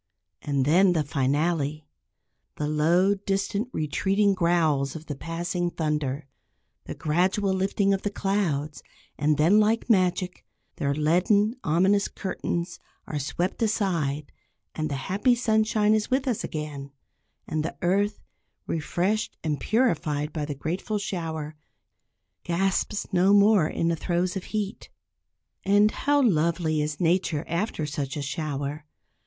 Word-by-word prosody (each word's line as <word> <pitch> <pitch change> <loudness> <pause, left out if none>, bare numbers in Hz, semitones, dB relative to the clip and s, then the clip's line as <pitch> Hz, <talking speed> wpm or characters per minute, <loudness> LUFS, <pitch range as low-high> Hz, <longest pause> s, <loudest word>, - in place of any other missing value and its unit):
And 140 -2 0
then 180 +5 +5
the 160 -3 +1
finale; 150 +1 0 0.7
the 150 - -2
low, 170 +6 +3
distant, 200 +3 -2
retreating 195 - +1
growls 165 -6 +1
of 160 0 -8
the 150 - -4
passing 175 +4 -3
thunder, 150 -4 -2 0.6
the - - -6
gradual 185 +5 +1
lifting 195 +1 +1
of 195 - -1
the 205 - -1
clouds, 165 -9 -1 0.4
and 150 0 +2
then 175 +8 +5
like 225 +3 +2
magic, 185 -2 +1 0.3
their 140 0 0
leaden, 185 - +2
ominous 190 +6 +3
curtains 175 -2 -4 0.3
are 150 - -3
swept 175 - -2
aside, 170 -10 0 0.4
and 155 -1 -2
the 140 - -2
happy 195 - +1
sunshine 220 -2 +2
is 215 -1 0
with 265 +1 0
us 240 -5 0
again, 150 -3 -5 0.6
and 155 0 -1
the - - -5
earth, 200 +4 +1 0.4
refreshed 180 +7 -1
and 150 -3 -1
purified 155 - 0
by 150 -2 -2
the 145 -1 -5
grateful 175 +9 -3
shower, 160 -6 -4 0.9
gasps 195 +4 0
no 185 +2 +4
more 205 -4 +5
in 165 - -1
the 170 - +1
throes 175 +2 -1
of 190 - -4
heat. 210 -2 -4 0.7
And 205 +2 +4
how 285 0 +2
lovely 165 -5 +1
is 150 0 -3
nature 170 -3 +1
after 170 -2 -2
such 145 -1 -4
a 145 - -3
shower. 145 0 -4
175 Hz, 135 wpm, -26 LUFS, 150-200 Hz, 0.9 s, then